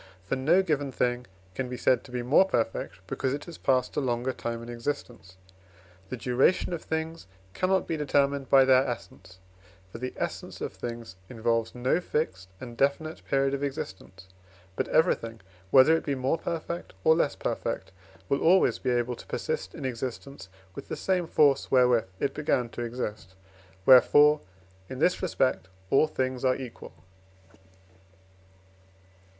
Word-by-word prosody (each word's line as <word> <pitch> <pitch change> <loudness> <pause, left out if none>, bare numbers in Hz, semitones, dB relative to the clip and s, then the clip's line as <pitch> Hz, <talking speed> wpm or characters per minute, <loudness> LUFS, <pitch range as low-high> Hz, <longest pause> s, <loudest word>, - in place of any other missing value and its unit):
For 100 - -1
no 160 +9 +3
given 145 -6 -1
thing 125 -1 -1 0.3
can 130 +4 -4
be 125 - -5
said 125 -1 +2
to 125 - -13
be 125 -1 -3
more 140 +10 +5
perfect, 115 - -2
because 130 +8 -2
it 145 - -8
has 170 -2 -10
passed 130 -1 +1
a - - +1
longer 125 -1 -1
time 115 0 -5
in - - -9
existence. 120 -5 -6 0.7
The 130 - -4
duration 130 +10 +2
of 165 - -4
things 160 -4 -4 0.3
cannot 185 - +1
be 165 - -2
determined 140 -2 +1
by 135 -1 +7
their 130 0 +5
essence, 120 -6 -8 0.5
for 115 - -8
the 130 +1 -4
essence - - -5
of - - -4
things 115 -5 -7
involves 115 -1 -1
no 125 +7 +1
fixed 95 - -3
and 120 -2 -8
definite 140 +5 -1
period 135 0 +1
of 140 - -2
existence; 95 -9 -6 0.5
but - - -1
everything, 115 -9 +1 0.3
whether 135 +8 +7
it 165 - -2
be 140 - -1
more 135 +5 0
perfect 170 - -5
or 160 - +6
less 160 -3 +1
perfect, - - -3 0.4
will 140 - 0
always 185 +4 +4
be 130 - -2
able 120 0 0
to - - -13
persist - - -4
in - - -6
existence 130 -2 -5 0.2
with - - -9
the - - -5
same 180 -3 0
force 145 -4 +3
wherewith 125 -3 +4
it 140 - -1
began 125 -5 0
to 120 - -7
exist; 110 -5 -5 0.5
wherefore, 145 +4 +7 0.5
in 130 - -6
this 180 +6 +2
respect, 135 - 0 0.2
all 155 - +5
things 130 -3 -2
are 130 -1 +3
equal. 125 -3 -9
130 Hz, 160 wpm, -27 LUFS, 120-150 Hz, 0.7 s, by